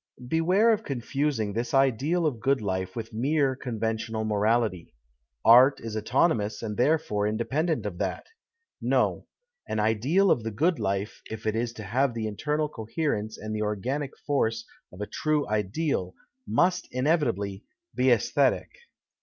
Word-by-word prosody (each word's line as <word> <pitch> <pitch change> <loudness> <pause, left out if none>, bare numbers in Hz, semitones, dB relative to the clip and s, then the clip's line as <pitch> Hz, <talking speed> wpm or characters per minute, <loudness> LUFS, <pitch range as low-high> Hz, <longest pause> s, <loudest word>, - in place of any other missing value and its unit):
Beware 180 - +3
of 220 0 -2
confusing 135 -4 -2
this 115 +4 -2
ideal 135 +6 +2
of 135 -7 -1
good 135 +4 +2
life 95 -3 -3
with 115 0 -6
mere 135 +3 +1
conventional 110 -2 -3
morality. 105 - 0 0.5
Art 125 +5 +7
is 115 -1 -6
autonomous 115 -1 +1
and 105 -2 -3
therefore 120 -6 +1
independent 130 +5 -1
of 90 -4 -5
that. 95 -2 -2 0.6
No; - - +1 0.2
" 485 0 -43
an 110 - -1
ideal 125 - +3
of - - +2
the 115 - -3
good 160 - +1
life, 100 +1 -2
if 110 0 -7
it 110 0 0
is 115 +1 -1
to 110 - -8
have 125 +5 0
the 115 -1 -2
internal 150 +8 -1
coherence 110 -4 -3
and 110 0 -5
the 105 - -2
organic 125 +7 -2
force 115 -6 0 0.3
of 90 - -10
a - - -1
true 155 +5 -1
ideal, 105 - -1 0.3
must 180 +1 +2
inevitably 125 - 0 0.3
be 125 - 0
ajsthctic. 125 +2 +2
115 Hz, 150 wpm, -27 LUFS, 105-145 Hz, 0.6 s, Art